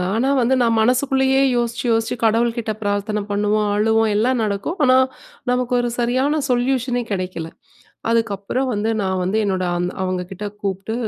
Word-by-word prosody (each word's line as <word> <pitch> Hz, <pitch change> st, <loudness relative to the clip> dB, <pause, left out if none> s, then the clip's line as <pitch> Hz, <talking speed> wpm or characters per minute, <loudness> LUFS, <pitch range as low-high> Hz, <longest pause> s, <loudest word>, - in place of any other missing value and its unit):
ஆனா, 260 Hz, +4 st, +1 dB
வந்து 250 Hz, +2 st, +3 dB
நான் 230 Hz, -1 st, +3 dB
மனசுக்குள்ளயே 265 Hz, +3 st, +2 dB
யோசிச்சு, 235 Hz, 0 st, -1 dB
யோசிச்சு 225 Hz, +1 st, 0 dB
கடவுள்கிட்ட 225 Hz, 0 st, +1 dB
பிரார்த்தனை 205 Hz, +1 st, -1 dB
பண்ணுவோம், 210 Hz, +1 st, +1 dB
அழுவோம், 220 Hz, +1 st, +2 dB
எல்லாம் 245 Hz, +3 st, +2 dB
நடக்கும். 210 Hz, -, -2 dB
ஆனா 255 Hz, 0 st, +5 dB, 0.5 s
நமக்கு 250 Hz, 0 st, 0 dB
ஒரு 240 Hz, 0 st, 0 dB
சரியான 260 Hz, +6 st, +1 dB
சொல்யூஷனே 245 Hz, 0 st, 0 dB
கிடைக்கல. 180 Hz, -4 st, -3 dB, 0.6 s
அதுக்கப்புறம் 225 Hz, +3 st, 0 dB
வந்து 210 Hz, +2 st, -1 dB
நான் 190 Hz, -1 st, -1 dB
வந்து 195 Hz, +4 st, 0 dB
என்னோட 185 Hz, -2 st, 0 dB
அந்த 180 Hz, +1 st, -1 dB
அவுங்ககிட்ட 185 Hz, +2 st, -4 dB, 0.2 s
கூப்பிட்டு 195 Hz, +2 st, -3 dB
225 Hz, 140 wpm, -20 LUFS, 205-250 Hz, 0.6 s, ஆனா